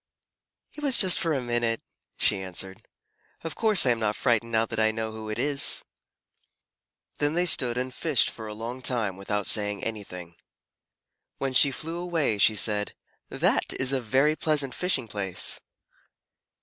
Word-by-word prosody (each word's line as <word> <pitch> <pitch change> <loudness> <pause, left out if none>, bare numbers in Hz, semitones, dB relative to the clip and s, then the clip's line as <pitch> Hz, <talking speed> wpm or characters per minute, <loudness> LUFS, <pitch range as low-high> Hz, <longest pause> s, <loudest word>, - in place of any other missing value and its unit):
"It 300 - -10
was 270 -4 +5
just 185 -3 +5
for 165 - -1
a 135 -4 -1
minute," 120 -1 -1 0.4
she 95 - +2
answered. 95 0 -4 0.6
"Of 165 -2 -5
course 215 -6 +4
I 125 - +4
am 115 - -1
not 105 -1 -1
frightened 115 -2 0
now 110 0 +2
that 110 0 -6
I 110 0 +3
know 110 0 -4
who 110 0 -8
it 110 - -4
is." 140 -1 +2 1.3
Then 145 +2 +1
they 175 +1 +2
stood 125 -8 +3
and 125 0 -3
fished 150 -3 +1
for 110 -1 -9
a 105 - -7
long 120 +4 -7
time 115 -7 -1
without 105 +1 -3
saying 105 -2 0
anything. 90 -6 -7 1.0
When 135 -1 -3
she 140 +2 +6
flew 165 +5 -5
away, 165 -11 -1
she 110 +2 +4
said, 105 0 +1 0.3
"That - - 0
is 130 +1 +2
a 135 - 0
very 135 +6 +2
pleasant 145 -5 -1
fishing 155 -9 -1
place." 100 -3 -1
120 Hz, 165 wpm, -26 LUFS, 105-145 Hz, 1.3 s, she